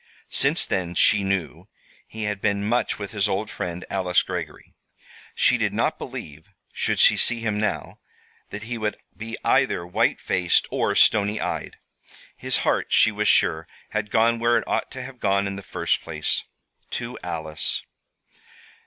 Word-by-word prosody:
Since 140 +5 +4
then, 90 -2 -2
she 100 +3 +4
knew, 95 -9 -2 0.4
he 110 0 -6
had 105 -1 -2
been 100 0 0
much 120 +2 0
with 100 -2 -6
his 105 -1 +1
old 105 +3 -2
friend, 90 0 -5
Alice 95 -2 +1
Greggory. 85 -5 -6 0.6
She - - +4
did - - 0
not - - 0
believe, 75 +5 -8 0.2
should - - 0
she - - +6
see 120 -1 +1
him 105 -2 -1
now, 110 - -3 0.5
that 105 +1 -7
he 115 +1 -5
would 105 -1 -2 0.2
be 115 +1 -6
either 85 - +2
white 90 - +1
faced, 90 -2 +2
or - - 0
stony 105 0 +4
eyed. - - -4 0.6
His - - 0
heart, - - +1
she 110 - +5
was 105 0 -1
sure, 80 -3 +3 0.2
had 105 -1 -2
gone 115 +1 +3
where 120 0 +3
it - - -3
ought - - -1
to 130 -1 -7
have 130 -1 -10
gone 100 0 +1
in 100 0 -3
the 100 - -7
first 95 - -1
place 75 -2 -2 0.4
to - - -5
Alice. 80 -2 -3
100 Hz, 165 wpm, -24 LUFS, 90-110 Hz, 0.6 s, she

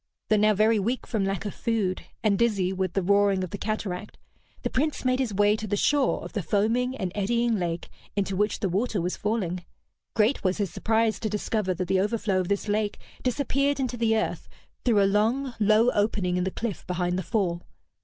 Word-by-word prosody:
Though 215 - +4
now 215 0 +4
very 215 +2 +4
weak 235 +6 -1
from 215 -5 -1
lack 195 +1 -2
of 205 - -3
food, 215 -6 -1 0.2
and 205 -3 +2
dizzy 200 -6 +2
with 185 -2 -2
the 195 - 0
roaring 200 0 +3
of 185 - -5
the - - -4
cataract, 210 -2 -4 0.5
the - - 0
Prince 300 0 -1
made 255 0 +2
his 255 -5 0
way 205 +1 +3
to 215 0 -5
the 205 - 0
shore 285 +4 +2
of - - -9
the 210 - -1
foaming 225 +8 +1
and 185 -6 -2
eddying 230 +2 +1
lake 170 -1 -2 0.3
into 195 -1 -1
which 210 +2 0
the 195 - +1
water 200 +4 0
was 180 +1 -1
falling. 190 -5 -2 0.5
Great 225 +5 +2
was 185 -1 +1
his 200 -5 -1
surprise 225 0 +1
to 220 - -2
discover 210 -2 -1
that 180 +1 -3
the 190 +1 +2
overflow 205 -2 0
of 185 - -1
this 200 +2 -1
lake 210 0 0 0.2
disappeared 275 +2 0
into 255 -2 -1
the 225 -1 +2
earth 220 - -2 0.3
through 215 -5 +4
a - - +4
long, 225 +7 +1
low 215 +3 +4
opening 205 -4 0
in 180 0 0
the - - 0
cliff 215 0 -4
behind 180 0 -1
the 185 - -1
fall. 175 -3 -1
210 Hz, 210 wpm, -26 LUFS, 190-230 Hz, 0.5 s, Though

